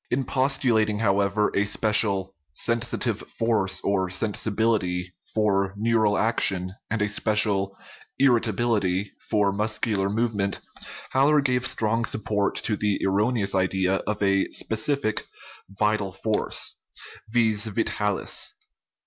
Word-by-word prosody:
In 130 +2 0
postulating, 125 -5 +1
however, 100 0 +1
a 100 - +3
special 100 -2 +2
" 70 0 -48
sensitive 115 -1 -1
force 110 -5 0
or 95 -2 0
sensibility 100 -2 -1
" - - -27
for 100 -2 +1
neural 110 -1 +2
action, 95 -5 +1 0.2
and 110 -1 0
a - - +1
special 105 -2 +1 0.4
"irritability" 110 -6 +1 0.2
for 105 -2 +2
muscular 105 -1 -1
movement, 105 -2 -1 0.5
Haller 145 +3 +4
gave 125 -3 0
strong 115 +1 0
support 105 -3 -1
to 110 - 0
the 105 -1 -1
erroneous 100 +1 +1
idea 95 0 +1
of 105 -1 -2
a 95 -1 +2
specific 110 +1 -1 0.4
"vital 105 0 0
force 105 +3 0 0.3
" - - -16
(vis 110 -2 +3
vitalis). 105 -1 -1
105 Hz, 115 wpm, -25 LUFS, 100-115 Hz, 0.5 s, Haller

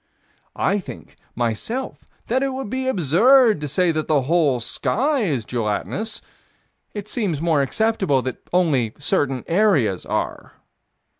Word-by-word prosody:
I 200 +1 +1
think, 185 - -10 0.2
myself, 120 - -3 0.2
that 255 +3 0
it 270 -1 -1
would 260 -5 -5
be 260 0 -2
absurd 220 - +4
to 150 - -3
say 170 +5 +1
that 155 -1 -2
the 145 -4 +2
whole 150 -3 +2
sky 250 - -1
is 145 - -1
gelatinous: 120 - -3 0.7
it 205 -1 -5
seems 205 - -2
more 160 -3 +2
acceptable 190 - +1
that 130 - -4
only 145 -11 +2
certain 135 -3 0
areas 165 - +2
are. - - -4
170 Hz, 135 wpm, -21 LUFS, 135-220 Hz, 0.7 s, absurd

